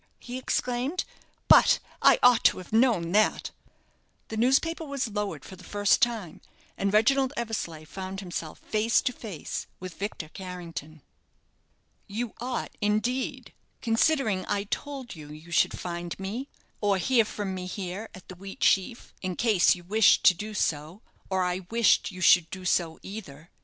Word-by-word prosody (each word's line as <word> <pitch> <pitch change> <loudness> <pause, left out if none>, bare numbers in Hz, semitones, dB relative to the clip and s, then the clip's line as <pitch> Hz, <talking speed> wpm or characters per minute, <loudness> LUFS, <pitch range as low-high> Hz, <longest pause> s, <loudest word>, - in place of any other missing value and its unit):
he 250 +1 -7
exclaimed. 255 +6 -1 0.4
"But - - +7 0.2
I - - +7
ought 245 -2 +6
to - - +5
have 185 +3 -10
known 225 -8 +3
that." 215 +3 +2 0.8
The 220 - -5
newspaper 270 +8 +2
was 280 -4 -2
lowered 205 -9 -4
for 190 - -10
the 185 - -15
first 205 +1 +2
time; 225 -9 -1 0.3
and 200 0 -1
Reginald 265 +6 +3
Eversleigh 205 -9 -4
found 190 +5 -6
himself 175 -4 -6
face 220 +2 +1
to 250 - 0
face 200 -12 -6
with 185 -1 -9
Victor 200 -5 -4
Carrington. 165 -5 -8 1.0
"You 225 +2 -4
ought, 250 +1 -3
indeed, 215 +5 -1 0.3
considering 225 -4 +1
I 200 -1 0
told 265 +3 -5
you 150 -2 -11
you 155 +3 -12
should 175 - +2
find 175 0 -5
me, 220 +8 -5 0.3
or 205 -2 +2
hear 235 +4 +3
from 205 -2 -4
me 180 -1 -5
here, 190 +3 -5
at 185 - -14
the - - -9
'Wheatsheaf,' 195 +4 -1
in 185 -1 -3
case 215 -6 +4
you 175 - -12
wished 210 +4 +4
to - - +8
do 210 +4 -7
so, 160 +3 -2 0.3
or 190 -1 +1
I 180 0 -2
wished 230 -1 +3
you 185 -1 -9
should 175 -3 +6
do 185 -1 -8
so 170 -2 +1
either. 175 -6 -9
200 Hz, 155 wpm, -27 LUFS, 180-235 Hz, 1.0 s, to